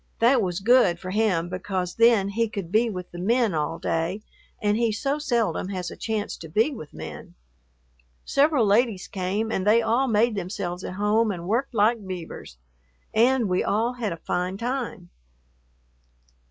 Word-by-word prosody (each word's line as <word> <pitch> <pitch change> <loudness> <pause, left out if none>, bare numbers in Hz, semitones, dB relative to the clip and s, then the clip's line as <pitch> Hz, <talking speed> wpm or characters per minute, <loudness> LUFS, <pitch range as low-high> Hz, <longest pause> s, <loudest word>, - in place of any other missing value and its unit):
That 240 +2 +4
was 180 -2 -2
good 240 -5 +4
for 185 +1 -7
him 195 -5 +1
because 185 0 -3
then 230 -4 +4
he 230 +2 0
could 200 -6 -6
be 225 +3 +3
with 180 -4 -6
the 175 - -8
men 230 +2 +2
all 155 +1 -1
day 170 +7 -2 0.4
and 205 0 +1
he 230 0 +1
so 275 +7 -1
seldom 235 -8 0
has 180 -3 -4
a - - -8
chance 215 -2 -3
to 165 - -10
be 220 - +2
with 155 - -9
men. 80 -1 -9 0.9
Several 280 -4 +3
ladies 210 -1 +2
came 200 +4 -2
and 190 - -1
they 230 +2 +5
all 235 +4 +2
made 225 0 +2
themselves 185 -2 -4
at - - -5
home 210 +3 +2
and 175 -3 -4
worked 240 +5 -1
like 215 -1 +2
beavers, 170 - -7 0.6
and 240 +1 +3
we 180 0 +1
all 230 +4 0
had 235 -5 -3
a 165 - -4
fine 180 +3 -2
time.... 235 -6 -4
210 Hz, 170 wpm, -25 LUFS, 180-230 Hz, 0.9 s, they